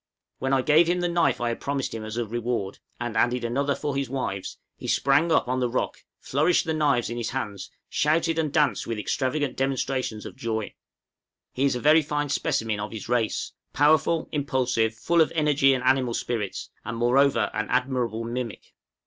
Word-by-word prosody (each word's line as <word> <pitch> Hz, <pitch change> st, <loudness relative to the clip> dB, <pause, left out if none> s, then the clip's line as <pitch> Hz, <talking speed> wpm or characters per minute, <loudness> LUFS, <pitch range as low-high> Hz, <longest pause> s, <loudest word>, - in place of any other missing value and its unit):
When 135 Hz, -, -1 dB
I 135 Hz, -1 st, +3 dB
gave 155 Hz, +4 st, +5 dB
him 175 Hz, +1 st, +1 dB
the 175 Hz, -, +1 dB
knife 170 Hz, -7 st, +2 dB
I 120 Hz, -, 0 dB
had 115 Hz, -, -3 dB
promised 140 Hz, -1 st, -2 dB
as 110 Hz, -1 st, -5 dB
his 120 Hz, 0 st, -1 dB
reward, 115 Hz, -3 st, -3 dB, 0.2 s
and 120 Hz, -2 st, -4 dB
added 120 Hz, +2 st, +2 dB
another 140 Hz, +4 st, 0 dB
for 145 Hz, -2 st, -3 dB
his 140 Hz, -2 st, -1 dB
wives, 125 Hz, -8 st, -4 dB, 0.2 s
he -, -, -8 dB
sprang 145 Hz, +5 st, +3 dB
up 160 Hz, -, +3 dB
on 130 Hz, +1 st, 0 dB
the 125 Hz, -1 st, +1 dB
rock, 125 Hz, -, -2 dB, 0.2 s
flourished 155 Hz, +7 st, +2 dB
the 160 Hz, -, -1 dB
knives 145 Hz, -7 st, +1 dB
in 120 Hz, -, -4 dB
his 115 Hz, -2 st, -2 dB
hands, 105 Hz, -7 st, -4 dB, 0.2 s
shouted, 165 Hz, +2 st, +1 dB
and 155 Hz, -3 st, 0 dB
danced 150 Hz, -3 st, +1 dB
with 115 Hz, -1 st, -2 dB
extravagant 130 Hz, +6 st, -1 dB
demonstrations 130 Hz, -4 st, -2 dB
of -, -, -8 dB
joy. 110 Hz, -2 st, -3 dB, 0.8 s
He 135 Hz, -, 0 dB
is 135 Hz, -, +2 dB
a -, -, -2 dB
very 155 Hz, +4 st, +5 dB
fine 145 Hz, -1 st, -2 dB
specimen 115 Hz, -8 st, 0 dB
of 105 Hz, +1 st, -4 dB
his 110 Hz, -2 st, -7 dB
race, 120 Hz, -3 st, 0 dB, 0.2 s
powerful, 155 Hz, +2 st, +3 dB
impulsive, 125 Hz, -6 st, 0 dB
full 170 Hz, +8 st, +2 dB
of 160 Hz, -, +3 dB
energy 150 Hz, -3 st, +4 dB
and 130 Hz, -2 st, 0 dB
animal 130 Hz, -3 st, +2 dB
spirits, 110 Hz, -5 st, -3 dB
and 120 Hz, -1 st, -5 dB
moreover 120 Hz, -2 st, +3 dB
an 110 Hz, +1 st, -2 dB
admirable 125 Hz, -3 st, 0 dB
mimic. 120 Hz, -1 st, -5 dB
130 Hz, 190 wpm, -25 LUFS, 115-145 Hz, 0.8 s, gave